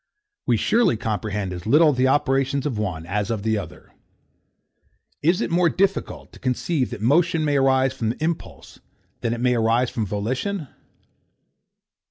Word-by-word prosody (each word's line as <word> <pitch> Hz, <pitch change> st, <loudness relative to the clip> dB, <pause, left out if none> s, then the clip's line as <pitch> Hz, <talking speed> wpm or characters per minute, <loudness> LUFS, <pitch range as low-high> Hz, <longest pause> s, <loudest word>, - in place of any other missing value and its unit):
We -, -, +3 dB
surely 230 Hz, -, +2 dB
comprehend 105 Hz, -3 st, -3 dB
as 90 Hz, +3 st, -7 dB
little 150 Hz, +4 st, +5 dB
the 130 Hz, 0 st, +2 dB
operations 135 Hz, 0 st, +1 dB
of 125 Hz, -8 st, -2 dB
one 90 Hz, -6 st, -3 dB
as 100 Hz, +3 st, -2 dB
of 110 Hz, -3 st, -2 dB
the 110 Hz, -1 st, +1 dB
other. 100 Hz, -, -11 dB, 1.3 s
Is 175 Hz, +7 st, +2 dB
it -, -, -2 dB
more 170 Hz, 0 st, +3 dB
difficult 195 Hz, +2 st, -1 dB
to -, -, -14 dB
conceive 130 Hz, +2 st, -1 dB
that -, -, -7 dB
motion 160 Hz, +5 st, +3 dB
may 145 Hz, -1 st, +2 dB
arise 135 Hz, -1 st, +3 dB
from 115 Hz, -4 st, -2 dB
impulse 160 Hz, +5 st, -5 dB, 0.4 s
than 115 Hz, -, -2 dB
that 120 Hz, -, -2 dB
it -, -, -3 dB
may 125 Hz, -1 st, +3 dB
arise 115 Hz, +1 st, +1 dB
from 115 Hz, -5 st, -2 dB
volition? 130 Hz, -, -3 dB
130 Hz, 160 wpm, -23 LUFS, 110-150 Hz, 1.3 s, little